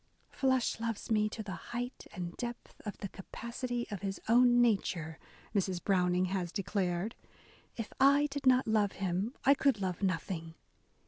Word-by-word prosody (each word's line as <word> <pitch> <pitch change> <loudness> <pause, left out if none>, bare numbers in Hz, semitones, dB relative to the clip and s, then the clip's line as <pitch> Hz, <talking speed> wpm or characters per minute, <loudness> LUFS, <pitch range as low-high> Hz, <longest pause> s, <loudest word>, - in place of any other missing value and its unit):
"Flush 260 -4 +1
loves 225 -1 -3
me 215 -1 +3
to 220 +1 -6
the 205 - -6 0.2
height 245 +1 -4
and 175 -2 -5
depth 240 -1 -6
of 205 - -4
the 200 - -4
capacity 235 +5 -4
of 200 -3 -4
his 195 -1 -3
own 240 +1 +6
nature," 190 -8 +1 0.3
Mrs. 190 -3 0
Brown 180 -3 +2
ing 180 +1 +3
has 180 -2 -2
declared, 195 +1 -1 0.6
if 230 -2 -5
I 280 +2 +6
did 280 -1 -2
not 255 -1 +5
love 215 -2 +2
him, 195 +5 -2
I 275 - +8
could 275 -5 +2
love 185 -2 -2
nothing 165 -3 -2
210 Hz, 165 wpm, -32 LUFS, 185-240 Hz, 0.6 s, I